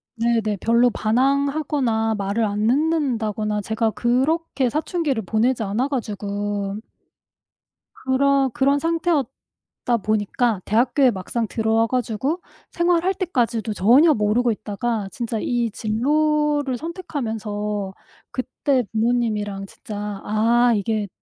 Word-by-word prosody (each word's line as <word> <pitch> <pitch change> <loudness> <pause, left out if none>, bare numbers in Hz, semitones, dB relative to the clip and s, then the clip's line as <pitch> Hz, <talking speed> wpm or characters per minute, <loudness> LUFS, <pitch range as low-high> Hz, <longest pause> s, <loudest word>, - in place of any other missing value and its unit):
네네. 225 -3 0
별로 235 +2 +4
반항하거나 265 -1 +1
말을 200 +3 0
안 210 +1 0
듣는다거나 230 -8 0
제가 220 +2 0
그렇게 265 +3 0
사춘기를 300 - -1
보내지 230 +4 +1
않아 220 +7 0
가지고 205 -5 -3 1.2
그렇 270 +1 +2
그런 280 +2 +2
상태였다 315 -7 -2
보니까 215 0 0
대학교에 245 +4 +3
막상 215 +4 -3
들어와 225 +1 +1
가지고 255 - -1 0.3
생활할 345 +2 +2
때까지도 240 - -1
전혀 255 - +5
모르고 220 +2 +2
있다가 210 0 -3
진짜 230 -2 -3
이 240 0 0
진로를 290 +5 +1
선택하면서 220 - -4 0.4
그때 255 0 -1
부모님이랑 220 -3 0
진짜 205 0 -7
'아 235 +3 +3
이게 210 0 -1
235 Hz, 270 characters per minute, -22 LUFS, 215-275 Hz, 1.2 s, 전혀